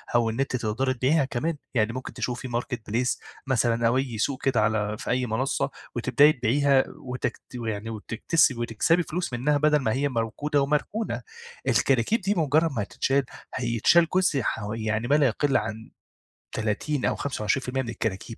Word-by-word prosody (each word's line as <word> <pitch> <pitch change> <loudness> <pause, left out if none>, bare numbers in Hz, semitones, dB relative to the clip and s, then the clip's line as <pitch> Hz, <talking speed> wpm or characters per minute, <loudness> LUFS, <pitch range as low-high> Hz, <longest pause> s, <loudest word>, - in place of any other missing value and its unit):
أو 120 -1 +3
إن 110 +3 -4
أنتِ 135 -1 0
تقدري 120 +3 0
تبيعيها 135 +4 +2
كمان، 140 +5 -2 0.2
يعني 115 -2 +1
ممكن 130 +1 -6
تشوفي 125 +1 -3
marketplace 120 0 -2 0.3
مثلًا 115 -2 +2
أو 120 +2 +2
أي 130 -4 -2
سوق 130 +5 -1 0.2
على 105 -1 +1
في - - -6
أي 125 0 +1
منصة 125 +4 -1 0.3
وتبدأي 150 +2 +5
تبيعيها 135 +2 +3 0.2
وتكت 125 0 -3
يعني 110 -2 -4
وتكس 115 +7 +1
وتكسبي 120 +8 +1
فلوس 175 -3 -4
منها 140 +5 +1
بدل 150 +1 +3
ما 115 -5 0
هي 140 +2 0
موجودة 130 +5 0
ومركونة. 150 +10 -1 0.5
الكراكيب 135 - +2
دي 195 +3 0
مجرّد 160 0 +2
ما 120 -6 -2
هتتشال، 135 +6 0 0.3
هيتشال 125 +7 +3
جزء 180 -7 +3
ح 110 - -2
و 105 +1 -4
يعني 110 +1 -1
ما 145 - +4
لا 145 -2 +4
يقِلّ 135 +4 +1
عن 110 +1 -5 0.6
30 115 +6 -1
أو - - +1
25% 130 +1 -1
من 120 - -6
الكراكيب 115 0 -4
125 Hz, 165 wpm, -26 LUFS, 115-145 Hz, 0.6 s, وتبدأي